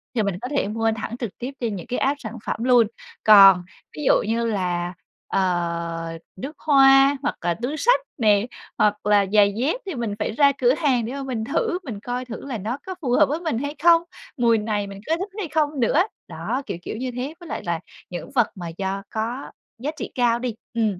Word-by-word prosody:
thì 220 - +2
mình 200 -3 -1
có 250 - -3
thể 280 -7 0
mua 225 +2 0
thẳng 225 +2 -5
trực 235 -6 -5
tiếp 250 +2 -5
trên 230 -4 -2
những 180 - -8
cái 250 - -2
app 280 +2 +1
sản 225 +1 -7
phẩm 225 - -2
luôn. 245 -3 +5 0.4
Còn 195 -4 +8 0.3
ví 300 - -4
dụ - - +6
như 230 +1 0
là, 180 -5 -1 0.3
ờ, 170 -2 -1 0.2
nước 270 +11 -7
hoa 275 -1 +6
hoặc - - -1
là 175 0 +1
túi 275 +6 -2
xách 485 +10 +4 0.2
nè, 210 -4 +3 0.3
hoặc 210 0 +1
là 205 -1 +4
giày 205 -1 +5
dép 290 - 0
thì 380 -5 -4
mình 230 -4 -2
phải - - -1
ra 280 +4 +4
cửa 245 0 +5
hàng 270 -6 +1
để 240 - -5
mà 275 0 -4
mình 250 -5 -3
thử, 360 - -1
mình 230 - -6
coi 245 +4 -4
thử 240 +1 -8
là 265 -4 -4
nó 220 +6 -3
có 375 - -5
phù 260 -5 -1
hợp 245 - +6
với 300 +3 -1
mình 320 -9 -2
hay 285 +4 -3
không, 335 -1 +7 0.4
mùi 235 -2 +4
này 210 -1 -2
mình 195 0 -9
có 320 - +2
thích 380 +4 -4
hay 400 - -3
không 300 -2 0
nữa. 260 +7 +3 0.3
Đó, 260 - -3
kiểu - - -4
kiểu, - - -6
như 255 +2 -3
thế, 265 +5 -4
với 345 -3 -11
lại - - -4
là 170 -1 -1 0.3
những 180 +8 -7
vật 240 -4 +4
mà 175 -3 -6
do 195 0 -3
có 230 +5 -4 0.3
giá 280 +6 -2
trị - - -5
cao 240 -2 +2
đi, 240 -3 -3 0.2
ừm, 215 -5 0
235 Hz, 230 wpm, -23 LUFS, 205-275 Hz, 0.4 s, Còn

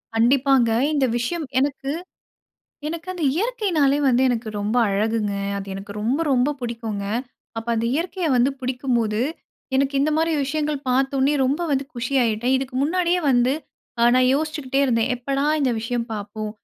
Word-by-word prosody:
கண்டிப்பாங்க. 250 +1 +4 0.2
இந்த 280 -3 +2
விஷயம் 310 +7 -2
எனக்கு 275 0 -1 1.0
எனக்கு 335 +2 -6
அந்த 355 - -6
இயற்கைனாலே 360 - +1
வந்து 250 0 +3
எனக்கு 235 -2 -1
ரொம்ப 210 +4 -1
அழகுங்க. 210 +1 0 0.3
அது 195 - -7
எனக்கு 195 +1 -7
ரொம்ப, 240 +8 0
ரொம்ப 255 +2 +3
புடிக்குங்க. 230 -4 -4 0.5
அப்ப 225 - -7
அந்த 225 - 0
இயற்கைய 345 +3 -2
வந்து 250 +2 +3
பிடிக்கும்போது, 245 -4 -1 0.6
எனக்கு 275 +1 +1
இந்த 295 +2 +2
மாதிரி 325 +1 +1
விஷயங்கள் 300 +1 -1
பார்த்த 270 +2 +1
உடனே 275 +3 +3
ரொம்ப 285 +7 0
வந்து 275 -1 +1
குஷியாயிட்டேன். 245 -1 +1
இதுக்கு 260 -1 -4
முன்னாடியே 355 +3 +1
வந்து 245 0 +3 0.5
அ - - +5
நான் 255 0 +4
யோசிச்சுக்கிட்டே 295 -3 -1
இருந்தேன். 235 -1 +1
எப்படா 275 +3 -2 0.2
இந்த 270 -3 +2
விஷயம் 235 +1 -2
பாப்போம்? 210 +1 -5
260 Hz, 150 wpm, -22 LUFS, 230-290 Hz, 1.0 s, அ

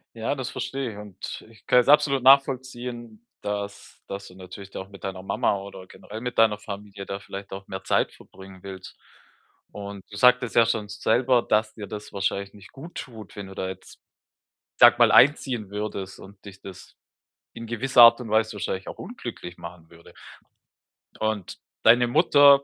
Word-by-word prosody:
Ja, 115 +5 -2
das 130 -3 -4
verstehe 130 0 -4
ich 100 - -12
und 105 -3 -8
ich 110 - -22
kann 125 - +6
es 125 - +1
absolut 140 -2 +4
nachvollziehen, 125 -4 +2 0.2
dass, 100 0 -6
dass 100 0 -7
du 90 - -15
natürlich 95 +1 -11
auch 95 - -6
mit 100 -1 -14
deiner 95 -1 -5
Mama 95 +1 0
oder 95 -1 -10
generell 105 +3 -10
mit 125 -1 -3
deiner 110 -2 +4
Familie 100 -1 -8
da 100 0 -5
vielleicht 100 0 -9
auch 95 0 -8
mehr 95 0 -7
Zeit - - +1
verbringen 95 -1 -15
willst. 95 -1 -10 0.7
Und 100 -1 -8
du 100 - -8
sagtest 125 +1 +4
ja 115 - +6
schon 110 -2 -1
selber, 120 +4 +2
dass 110 0 0
dir 105 - -7
das 105 +1 -8
wahrscheinlich 100 0 -2
nicht 100 - -15
guttut, 135 -7 -10
wenn 100 -1 -7
du 95 - -11
da 95 - -3
jetzt, 95 - -11 0.8
sage - - +7
mal, - - +6
einziehen 130 -7 +4
würdest 100 -2 -5
und 100 0 -15
dich 100 -2 -12
das 95 -2 -12 0.6
in 115 - -8
gewisser 120 +2 +4
Art 115 +1 +8
und 120 - -7
Weise 110 0 +1
wahrscheinlich 95 -2 -4
auch - - -8
unglücklich 90 0 -8
machen 85 -1 -11
würde. 85 0 -17 1.0
Und 110 -3 -3 0.2
deine 120 +2 +6
Mutter 140 0 +6
105 Hz, 175 wpm, -25 LUFS, 100-120 Hz, 1.0 s, Art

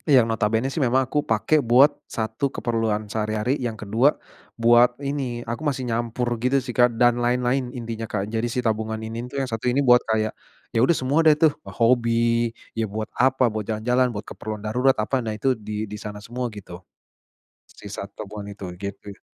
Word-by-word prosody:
yang 125 -3 +6
notabene 115 +2 0
sih 155 - -1
memang 130 +1 +3
aku 150 +3 -1
pake 115 +8 +3
buat 130 +4 +6 0.2
satu 110 +5 -2
keperluan 115 -3 -1
sehari-hari, 110 +5 -1
yang 115 -3 -3
kedua 110 +6 +3 0.5
buat 120 +1 +6 0.2
ini, 130 -4 -3
aku 120 +5 -4
masih 130 -2 -3
nyampur 115 +1 -1
gitu 130 +3 +2
sih 125 - -5
Kak 120 -2 +3
dan 120 +1 +5
lain-lain, 125 +1 +1
intinya 115 -1 -5
Kak. 100 -2 -1
Jadi 115 +1 0
si 125 - -2
tabungan 110 0 -1
ini 115 +2 -5
tuh 140 - -7
yang 130 - -4
satu 115 +2 -1
ini 135 +3 +1
buat 125 0 +6
kayak, 110 -1 +1 0.4
ya - - +2
udah 165 +7 +4
semua 135 +4 +1
deh 155 - +7
tuh, 155 -1 +5 0.3
hobi, 115 0 +3 0.2
ya 110 -2 -2
buat 110 +2 -4
apa, 130 0 +3
buat 110 -1 -3
jalan-jalan, 125 +4 +1
buat 105 -3 -6
keperluan 110 -1 -7
darurat, 125 +5 +2
apa, 125 +5 0
nah 115 - -4
itu 130 +5 +2
di 105 -2 -5
di 105 0 -7
sana 105 -1 -6
semua 125 +1 -3
gitu. 90 -2 -10 0.9
Sisa - - -9 0.2
tabungan 105 -1 -7
itu, 100 - -8 0.2
gitu 100 0 -6
ya. - - -19
115 Hz, 190 wpm, -23 LUFS, 110-125 Hz, 0.9 s, deh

